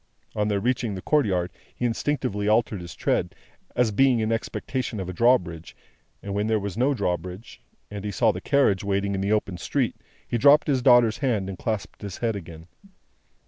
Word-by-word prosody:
On 105 -1 0
their 100 -1 +1
reaching 120 -2 -1
the 95 - -6
courtyard 95 - +1 0.2
he 125 - -2
instinctively 120 -4 -1
altered 110 -2 +2
his 85 -1 -9
tread, - - -1 0.4
as 120 -3 +2
being 130 +4 +4
in 110 0 0
expectation 120 0 -3
of 95 - -4
a 90 - -5
drawbridge; 90 -8 +1 0.5
and 100 - -4
when 105 +1 0
there 110 -1 +2
was 100 -2 -5
no 135 +4 +2
drawbridge, 90 +1 -4 0.3
and 100 -1 -6
he 105 - -3
saw 110 +3 +2
the - - -7
carriage 135 -10 +2
waiting 100 0 0
in 95 - -2
the 100 +2 0
open 100 -4 0
street, - - -1 0.3
he 120 - -1
dropped 145 +4 +6
his 135 -3 +1
daughter's 120 -3 +5
hand 110 -9 0
and 95 - -7
clasped 110 -3 -4
his 100 -3 -6
head 115 -2 -1
again. 80 -4 -9
105 Hz, 190 wpm, -25 LUFS, 95-120 Hz, 0.5 s, dropped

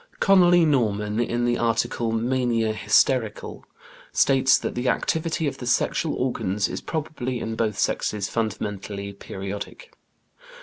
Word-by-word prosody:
Conolly 175 -3 +5
Norman, 105 -7 0
in 120 0 0
the 120 0 +1
article 115 0 0
"Mania, 115 -1 0
Hysterical" 115 +1 +1
(Tuke's - - -19
Psychological - - -23 0.3
Dictionary), - - -8
states 130 - +7
that - - -4
"the 125 +1 -1
activity 160 -1 0
of - - -3
the 125 - -6
sexual 145 +5 +1
organs 105 -6 -1
is - - -5
probably 135 -6 -4
in 110 0 -4
both 110 -3 -1
sexes 105 -2 -1
fundamentally 100 -2 -4
periodic." 100 - -7
120 Hz, 140 wpm, -24 LUFS, 105-130 Hz, 0.3 s, states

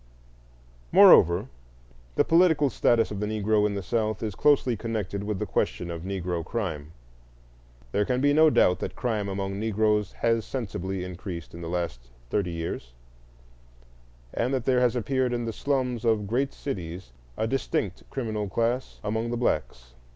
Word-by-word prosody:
Moreover, 85 +5 +7 0.7
the - - +4
political 160 -5 +4
status 115 -1 +2
of 100 - -4
the 105 - -1
Negro 105 0 +2
in 100 - -3
the 100 - -3
South 110 +1 -1
is 110 -3 -2
closely 130 -1 +3
connected 105 -3 -3
with 105 -1 -2
the - - -2
question 85 -1 -1
of 85 -1 -5
Negro 90 -2 -3
crime. 80 -7 -4 1.0
There 105 - +2
can 125 +4 0
be 145 +2 +3
no 155 +1 +6
doubt 90 -10 +3
that - - -5
crime 110 -5 -1
among 95 0 -3
Negroes 105 -1 +1
has 115 -1 +1
sensibly 95 -7 -4
increased 90 -2 -7
in 85 - -9
the 85 - -5
last 85 -7 -2 0.3
thirty 100 -4 0
years, 85 -8 -5 1.4
and 125 +3 0
that 125 -3 -3
there 130 -1 +3
has 125 -1 +2
appeared 130 +1 0
in 120 -1 -2
the 115 - -3
slums 125 -2 -1
of 110 -3 +2
great 130 +7 0
cities 90 - -6 0.3
a - - 0
distinct 110 -5 -2
criminal 110 -6 -3
class 120 +5 -1
among 110 +2 -1
the 120 - -2
blacks. 65 - -2
105 Hz, 160 wpm, -26 LUFS, 95-120 Hz, 1.4 s, Moreover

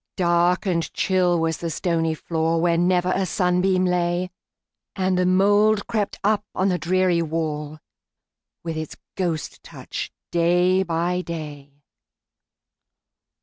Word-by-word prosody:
Dark 175 0 +2
and 170 -4 -1
chill 180 -2 +2
was 165 0 0
the 170 - -3
stony 165 -1 -1
floor, 165 +1 -1
Where 170 0 +2
never 180 +1 +2
a 195 - 0
sunbeam 185 +1 +1
lay, 180 0 0 0.6
And 185 -1 0
the 180 0 +2
mould 205 +3 +3
crept 210 -3 -2
up 210 0 +2
on 190 +2 +1
the 180 -1 0
dreary 180 +1 +2
wall, 155 -2 -3 0.9
With 165 -1 -4
its 155 -1 -5 0.2
ghost 170 -5 -3
touch, - - -7 0.2
day 175 +2 +3
by 175 0 -1
day. 145 -4 -8
175 Hz, 125 wpm, -23 LUFS, 165-185 Hz, 0.9 s, mould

